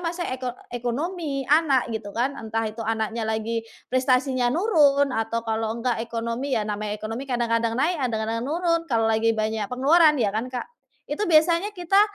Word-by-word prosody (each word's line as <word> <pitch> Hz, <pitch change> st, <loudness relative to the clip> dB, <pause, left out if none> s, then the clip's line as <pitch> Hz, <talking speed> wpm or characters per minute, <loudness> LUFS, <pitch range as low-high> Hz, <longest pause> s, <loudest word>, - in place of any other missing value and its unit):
masa 350 Hz, 0 st, -3 dB
eko 255 Hz, -1 st, -3 dB, 0.2 s
ekonomi, 275 Hz, +4 st, -3 dB
anak 280 Hz, -5 st, +3 dB
gitu 220 Hz, -2 st, -4 dB
kan? 255 Hz, +4 st, +1 dB
Entah 225 Hz, 0 st, -2 dB
itu 220 Hz, +1 st, -5 dB
anaknya 225 Hz, 0 st, -2 dB
lagi 220 Hz, +1 st, -1 dB, 0.3 s
prestasinya 255 Hz, -1 st, +2 dB
nurun 285 Hz, -, +3 dB
atau 230 Hz, 0 st, -2 dB
kalau 225 Hz, 0 st, -1 dB
enggak 235 Hz, -1 st, -1 dB
ekonomi, 235 Hz, +3 st, -2 dB
ya 215 Hz, -, 0 dB
namanya 210 Hz, 0 st, -3 dB
ekonomi 225 Hz, +6 st, -6 dB
kadang-kadang 230 Hz, -1 st, 0 dB
naik, 315 Hz, +4 st, +1 dB
kadang-kadang 225 Hz, -2 st, -1 dB
nurun, 335 Hz, +5 st, 0 dB
kalau 230 Hz, -3 st, +2 dB
lagi 225 Hz, 0 st, +2 dB
banyak 215 Hz, -1 st, -1 dB
pengeluaran 300 Hz, +5 st, +4 dB
ya 215 Hz, -7 st, +1 dB
kan, 225 Hz, +4 st, -2 dB
Kak? 250 Hz, -1 st, -4 dB, 0.4 s
Itu 345 Hz, +7 st, -2 dB
biasanya 335 Hz, +4 st, +4 dB
kita 360 Hz, +3 st, +3 dB
245 Hz, 165 wpm, -24 LUFS, 225-290 Hz, 0.4 s, pengeluaran